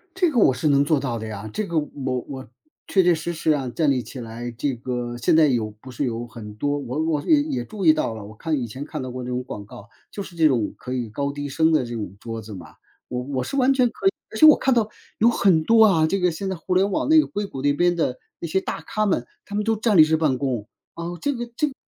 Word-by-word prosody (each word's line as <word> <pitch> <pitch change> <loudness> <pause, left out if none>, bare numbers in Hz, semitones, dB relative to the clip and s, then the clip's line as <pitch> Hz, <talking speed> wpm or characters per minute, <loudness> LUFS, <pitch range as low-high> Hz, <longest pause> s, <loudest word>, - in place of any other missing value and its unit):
这 360 -4 +2
个 245 - +2
我 135 - +5
是 130 +5 -1
能 140 -1 +4
做 150 -1 +2
到 120 -4 -3
的 110 - -6
呀， 110 0 -6
这 215 - -2
个 170 -3 -2
我 135 -4 -3
我 135 -2 -7 0.4
确 190 - +3
确 175 0 +5
实 170 +2 -3
实 160 -1 +1
啊， 135 -4 0
站 150 +3 +1
立 130 -2 +1
起 130 +2 -9
来， 120 +1 -6
这 130 +4 -2
个 120 0 -4
现 120 - +2
在 160 -2 +6
有 115 -5 0
不 130 - -10
是 130 +3 -2
有 120 0 -3
很 110 -3 -10
多 145 +6 -1
我 140 +3 -3
我 155 -3 0
也 300 -2 +4
也 290 -4 -3
注 205 -4 -5
意 155 - +8
到 115 - -1
了， 105 -2 -8
我 105 +1 -12
看 155 +4 -1
以 120 - -2
前 130 +5 -7
看 155 -2 -5
到 130 -1 -5
过 125 0 -6
这 125 - -5
种 125 0 -2
广 105 -5 -7
告， 105 +1 -13 0.2
就 200 - -5
是 180 - -12
这 160 -2 +5
种 120 -7 0
可 125 - -6
以 120 -4 -3
高 140 +6 -2
低 145 0 -5
升 160 +3 +2
的 155 -6 +2
这 120 - -6
种 105 -4 -5
桌 115 -1 -6
子 110 0 -10
嘛。 85 -5 -11 0.3
我 125 0 -3
我 130 -2 -2
是 275 - -5
完 270 0 +4
全 255 -2 +3
可 385 - -10
以 - - +8 0.2
而 - - -6
且 310 - +7
我 305 - +9
看 265 - +2
到 225 -3 +1 0.3
有 230 - +6
很 190 -8 +3
多 225 +3 +6
啊， 160 -6 +4
这 195 +3 0
个 180 -1 +2
现 190 +4 -4
在 190 - -2
互 175 +2 -3
联 195 +2 +3
网 190 - 0
那 315 0 +7
个 - - +2
硅 205 0 -3
谷 135 -8 -7
那 145 0 +3
边 175 +3 +2
的， 130 -6 -1 0.2
那 170 - -4
些 190 +4 +1
大 - - -5
咖 215 0 -1
们， 150 -11 0 0.2
他 205 - -7
们 210 - 0
都 225 +1 +1
站 215 -1 +1
立 155 - +10
式 160 +1 +2
办 150 -5 +1
公， 125 -6 -2 0.3
啊， 170 - -6 0.2
这 285 -1 0
个 240 -1 -4
这 300 - +1
个 280 - -6
145 Hz, 315 characters per minute, -23 LUFS, 125-190 Hz, 0.4 s, 立